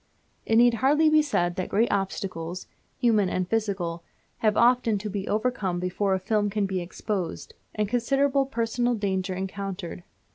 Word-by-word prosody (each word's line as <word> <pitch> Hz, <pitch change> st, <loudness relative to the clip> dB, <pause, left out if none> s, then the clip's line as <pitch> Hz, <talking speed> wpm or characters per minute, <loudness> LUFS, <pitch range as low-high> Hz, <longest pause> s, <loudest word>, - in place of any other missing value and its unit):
It 225 Hz, -, +2 dB
need 240 Hz, +1 st, +6 dB
hardly 295 Hz, +7 st, +3 dB
be 310 Hz, 0 st, +6 dB
said 175 Hz, -12 st, 0 dB
that 185 Hz, -, -2 dB
great 225 Hz, +4 st, +2 dB
obstacles, 185 Hz, -3 st, -3 dB, 0.3 s
human 215 Hz, -6 st, +3 dB
and 185 Hz, 0 st, -1 dB
physical, 190 Hz, -6 st, -2 dB, 0.3 s
have 215 Hz, -2 st, +1 dB
often 235 Hz, -2 st, +4 dB
to 210 Hz, +1 st, -5 dB
be 195 Hz, -1 st, -4 dB
overcome 210 Hz, -5 st, -1 dB
before 190 Hz, +2 st, 0 dB
a -, -, -2 dB
film 205 Hz, +2 st, 0 dB
can 205 Hz, 0 st, 0 dB
be 190 Hz, -2 st, -2 dB
exposed; 180 Hz, +1 st, -4 dB, 0.2 s
and 210 Hz, -1 st, 0 dB
considerable 270 Hz, +4 st, +1 dB
personal 240 Hz, 0 st, 0 dB
danger 190 Hz, -3 st, -1 dB
encountered. 190 Hz, -2 st, -5 dB
205 Hz, 155 wpm, -26 LUFS, 185-235 Hz, 0.3 s, need